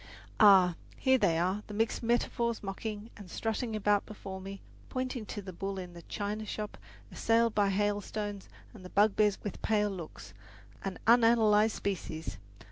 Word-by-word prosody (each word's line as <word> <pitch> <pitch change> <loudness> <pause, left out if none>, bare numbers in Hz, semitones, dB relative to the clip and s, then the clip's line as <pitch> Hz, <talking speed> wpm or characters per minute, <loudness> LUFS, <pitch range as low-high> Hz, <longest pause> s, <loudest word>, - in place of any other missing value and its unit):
Ah, 190 -4 +7 0.2
here 260 -1 +3
they 165 -7 +3
are 185 +5 0
the 210 - -7
mixed 225 +1 0
metaphors 235 -1 0
mocking 210 +2 -5
and 200 -4 -11
strutting 225 +3 -2
about 205 -1 +2
before 195 -2 -8
me, 195 +1 -7 0.3
pointing 255 -4 -3
to 205 - -5
the 185 -1 -8
bull 195 +2 -4
in 180 -2 -7
the 170 - -10
china 210 +4 -4
shop 210 0 -5 0.4
assailed 230 0 +2
by 205 -1 +3
hailstones 205 0 -2 0.2
and 210 -5 -12
the 180 - -9
bugbears 205 0 +3
with 205 - -5
pale 210 -2 +1
looks, 160 - -8 0.5
an 195 -1 -4
unanalyzed 225 -2 +5
species! 160 - -4
205 Hz, 155 wpm, -31 LUFS, 195-220 Hz, 0.5 s, Ah